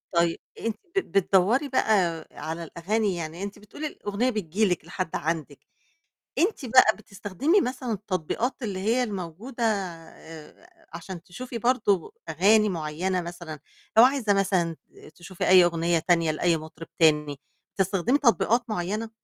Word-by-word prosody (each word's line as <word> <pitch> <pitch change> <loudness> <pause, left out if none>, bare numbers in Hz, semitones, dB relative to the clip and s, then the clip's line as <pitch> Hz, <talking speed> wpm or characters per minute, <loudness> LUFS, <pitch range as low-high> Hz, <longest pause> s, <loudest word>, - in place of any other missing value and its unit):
طيّب 170 0 +2 0.2
أنتِ 225 -2 -3 0.2
بت 390 - +1
بتدوّري 200 - +2
بقى 180 -10 +1
على 160 +3 -6
الأغاني 195 +5 -1
يعني 165 +2 -5
أنتِ 200 +1 -6
بتقولي 250 +9 -7
الأغنية 220 -2 -2
بتيجي 210 -2 0
لِك 180 -5 -1
لحد 180 0 -4
عندِك، 155 -3 -3 0.8
أنتِ 360 - +1
بقى 245 -2 +6
بتستخدمي 215 - 0
مثلًا 250 -3 -3
التطبيقات 210 - -2
اللي 200 -6 -3
هي 230 +6 +1
الموجودة 210 +4 -5
آآ 190 - -6
عشان 170 +1 -8
تشوفي 245 +7 -7
برضه 220 -6 +1 0.2
أغاني 205 +7 +4
معينة 175 +2 -2
مثلًا 170 -3 -8 0.4
لو 225 - +10
عايزة 255 -5 +3
مثلًا 185 -4 +1 0.2
ت - - -16
تشوفي 175 +1 -4
أي 185 -1 +8
أغنية 170 0 +1
تانية 165 -1 +2
لأي 170 +2 +1
مطرب 160 +1 -10
تاني، 150 -3 +3 0.4
بتستخدمي 195 +6 +1
تطبيقات 240 -2 +3
معينة؟ 215 +3 -2
190 Hz, 135 wpm, -26 LUFS, 170-225 Hz, 0.8 s, لو